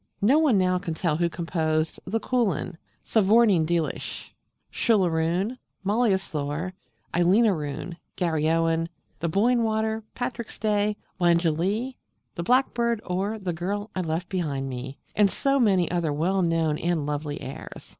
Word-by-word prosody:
No 265 Hz, +9 st, +5 dB
one 290 Hz, -9 st, +4 dB
now 185 Hz, -1 st, +2 dB
can 170 Hz, -4 st, -4 dB
tell 160 Hz, -2 st, 0 dB
who 170 Hz, 0 st, +1 dB
composed 160 Hz, -2 st, -1 dB
"The 220 Hz, +4 st, -1 dB
Coolin," 200 Hz, -, -1 dB, 0.3 s
"Savourneen 210 Hz, -5 st, +4 dB
Dheelish," 170 Hz, -2 st, -2 dB, 0.4 s
"Shule 215 Hz, -6 st, +3 dB
Aroon," 175 Hz, +8 st, 0 dB, 0.2 s
"Molly 215 Hz, +3 st, +2 dB
Asthore," 165 Hz, -1 st, -2 dB, 0.4 s
"Eileen 180 Hz, +7 st, +4 dB
Aroon," 165 Hz, -2 st, -2 dB, 0.2 s
"Garryowen," 165 Hz, 0 st, +1 dB, 0.3 s
"The 170 Hz, -, -1 dB
Boyne 235 Hz, +8 st, +3 dB
Water," 220 Hz, 0 st, 0 dB
"Patrick's 245 Hz, -2 st, -4 dB
Day," 210 Hz, 0 st, +1 dB, 0.2 s
"Langolee," 175 Hz, +8 st, +1 dB, 0.4 s
"The -, -, -4 dB
Blackbird," 235 Hz, +1 st, +2 dB
or 195 Hz, +4 st, -1 dB
"The 190 Hz, -4 st, -3 dB
Girl 205 Hz, +6 st, -3 dB
I 185 Hz, -, 0 dB
left 165 Hz, +1 st, -2 dB
behind 145 Hz, -8 st, -2 dB
me"; 130 Hz, +2 st, -6 dB, 0.2 s
and 205 Hz, -1 st, +5 dB
so 275 Hz, +8 st, +1 dB
of -, -, +2 dB
many 190 Hz, -7 st, +3 dB
other 170 Hz, -3 st, 0 dB
well 180 Hz, +6 st, +1 dB
known 165 Hz, -3 st, +1 dB
and 170 Hz, -3 st, 0 dB
lovely 145 Hz, 0 st, -3 dB
airs. 135 Hz, -, -9 dB
180 Hz, 145 wpm, -26 LUFS, 165-215 Hz, 0.4 s, No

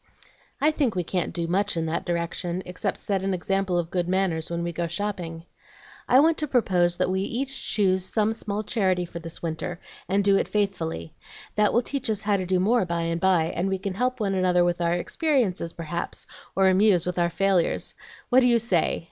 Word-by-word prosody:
"I 300 Hz, +2 st, +4 dB
think 275 Hz, -8 st, 0 dB
we 180 Hz, -, 0 dB
can't 180 Hz, +1 st, -2 dB
do 170 Hz, -1 st, -3 dB
MUCH 185 Hz, +1 st, 0 dB
in 165 Hz, -, 0 dB
that 160 Hz, +1 st, -2 dB
direction, 175 Hz, +1 st, -2 dB
except 180 Hz, -, -3 dB
set 195 Hz, -2 st, -1 dB
an 195 Hz, -1 st, 0 dB
example 190 Hz, 0 st, 0 dB
of 170 Hz, -1 st, -2 dB
good 175 Hz, -2 st, 0 dB
manners 180 Hz, -3 st, 0 dB
when 170 Hz, 0 st, -2 dB
we 170 Hz, -, -2 dB
go 170 Hz, 0 st, -2 dB
shopping. 175 Hz, -3 st, -4 dB, 0.6 s
I 255 Hz, -, +7 dB
wanted 320 Hz, +3 st, +4 dB
to 305 Hz, -, -1 dB
propose 180 Hz, -9 st, +2 dB
that -, -, +1 dB
we 190 Hz, 0 st, 0 dB
each 260 Hz, +7 st, -3 dB, 0.2 s
choose 190 Hz, -3 st, +2 dB
some 215 Hz, +3 st, +1 dB
small 210 Hz, -1 st, -3 dB
charity 190 Hz, -5 st, 0 dB
for 170 Hz, 0 st, -8 dB
this 165 Hz, 0 st, -8 dB
winter, 165 Hz, +1 st, -4 dB, 0.3 s
and 200 Hz, +2 st, +2 dB
do 195 Hz, 0 st, +4 dB
it -, -, 0 dB
faithfully. 175 Hz, -, -2 dB, 0.4 s
That 210 Hz, 0 st, +3 dB
will 240 Hz, -, +2 dB
teach 275 Hz, -1 st, -3 dB
us 215 Hz, -1 st, -1 dB
how 205 Hz, -1 st, +2 dB
to 185 Hz, -2 st, -3 dB
do 185 Hz, 0 st, +2 dB
more 220 Hz, +4 st, +3 dB
by 170 Hz, -1 st, -2 dB
and 165 Hz, 0 st, -2 dB
by, 175 Hz, -4 st, +3 dB
and 180 Hz, +3 st, 0 dB
we 190 Hz, -, 0 dB
can 195 Hz, 0 st, -4 dB
help 250 Hz, +5 st, -1 dB
one 200 Hz, -3 st, 0 dB
another 180 Hz, -2 st, +3 dB
with 175 Hz, 0 st, 0 dB
our 170 Hz, 0 st, +2 dB
experiences, 195 Hz, -, 0 dB
perhaps, 170 Hz, +1 st, -5 dB, 0.3 s
or 195 Hz, 0 st, +4 dB
amuse 190 Hz, -2 st, +4 dB
with 180 Hz, 0 st, -2 dB
our 170 Hz, 0 st, +2 dB
failures. 190 Hz, 0 st, +1 dB, 0.4 s
What 255 Hz, -, +6 dB
do 250 Hz, -, +4 dB
you 240 Hz, -1 st, +5 dB
say?" 210 Hz, -7 st, +1 dB
185 Hz, 215 wpm, -25 LUFS, 175-210 Hz, 0.6 s, I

